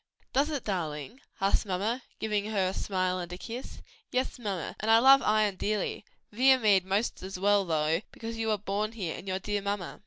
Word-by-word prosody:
"Does 280 +4 +3
it, 290 -5 -3
darling?" 175 - -4 0.2
asked 195 +1 +2
mamma, 210 +6 -1 0.2
giving 210 -2 -1
her 205 -3 0
a - - -4
smile 185 -2 -1
and 175 -1 -6
a 180 - -5
kiss. 235 +6 -8 0.3
"Yes, 255 0 -1
mamma; 200 -7 -4
and 215 - -2
I 225 - +8
love 270 +3 +7
Ion 215 -2 +2
dearly: 210 0 -2 0.3
Viamede 225 -6 +5
'most 200 +5 -1
as 190 0 -6
well, 200 +1 +3
though, 160 0 +1
because 230 0 -6
you 225 0 -2
were 215 -1 +2
born 210 +2 -2
here, 185 -8 -4
and 195 - -10
your 185 0 -1
dear 205 +1 -2
mamma." 200 -2 -3
205 Hz, 195 wpm, -29 LUFS, 185-225 Hz, 0.3 s, I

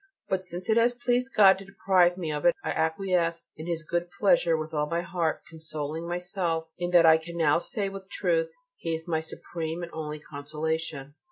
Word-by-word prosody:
But 190 -1 0
since 180 0 -6
it 220 - +3
has 235 +1 +4
pleased 245 +2 0
God 195 -2 +7
to 195 - -10
deprive 185 -2 +3
me 165 -4 -3
of 150 -1 -3
it 175 - +5
I - - -1
acquiesce 170 +1 0
in 155 +2 -8
His 165 -1 -2
good 175 +2 -2
pleasure 170 -5 +4
with 155 +1 -5
all 150 -1 0
my 170 0 0
heart, 175 -3 -1
consoling 155 0 -5
myself 175 -2 -2
in 175 0 -1
that 175 -2 +6
I 160 0 +7
can 170 +1 -8
now 155 -1 +4
say 200 +3 -2
with 195 0 -8
truth: - - +1 0.3
"He 165 -1 -2
is 160 +1 -8
my 160 -2 +1
supreme 160 +1 -5
and 170 - -6
only 155 -1 -4
consolation." 150 0 -4
170 Hz, 200 wpm, -27 LUFS, 160-185 Hz, 0.3 s, God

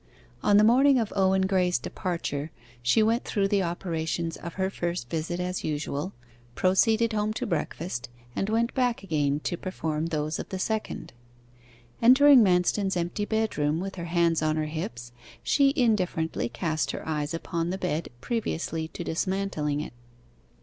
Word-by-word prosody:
On 205 - +4
the 210 - +6
morning 260 +5 +5
of 225 -4 -1
Owen 190 -1 +3
Graye's 180 -2 +2
departure, 165 -5 -3 0.3
she 120 - +4
went 230 +3 +2
through 200 -2 0
the 200 0 +2
operations 170 -1 -2
of 170 -1 -8
her 190 0 -1
first 170 -10 -3
visit 165 +2 -2
as 180 0 -2
usual 150 +2 -2 0.4
proceeded 220 +5 +3
home 210 0 0
to 250 - -3
breakfast, 165 - -3 0.3
and 195 - -1
went 230 +2 +1
back 245 -5 0
again, 150 -5 0
to 175 - -2
perform 160 -4 -2
those 155 -1 -2
of - - -6
the 190 - -3
second. 220 +3 -3 0.9
Entering 260 +2 +8
Manston's 190 +1 +2
empty 175 +4 -2
bedroom, 185 -9 0
with 195 +2 -4
her 170 -2 -6
hands 170 -1 +2
on 155 0 +1
her 155 -1 0
hips, 120 -7 -5 0.3
she 280 -1 +4
indifferently 185 - +1
cast 155 -1 -1
her - - -5
eyes 150 0 -2
upon 165 0 -2
the 185 - -2
bed, 170 -4 -2
previously 165 - -2
to 170 - -7
dismantling 165 -5 -1
it. - - -7
180 Hz, 155 wpm, -27 LUFS, 160-210 Hz, 0.9 s, Entering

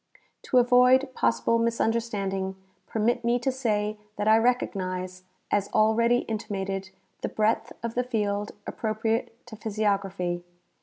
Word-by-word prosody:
To 255 - +2
avoid 250 +2 +5
possible 115 - +2
misunderstanding, 220 -4 -1 0.4
joermit 230 +3 +1
me 235 +1 +2
to 245 +2 0
say 215 -5 -1 0.2
that 205 +1 -2
I 220 - +7
recognize, 185 -6 -1 0.3
as 205 -1 +1
already 230 +3 +4
intimated, 195 -3 -4 0.3
the - - -2
breadth 220 +1 0
of 235 -1 -3
the 250 - 0
field 210 -4 -1
appro 215 -1 -3
priate 225 +1 0 0.2
to 235 -2 -10
iDhysiography. 200 -5 -1
220 Hz, 130 wpm, -27 LUFS, 195-235 Hz, 0.4 s, I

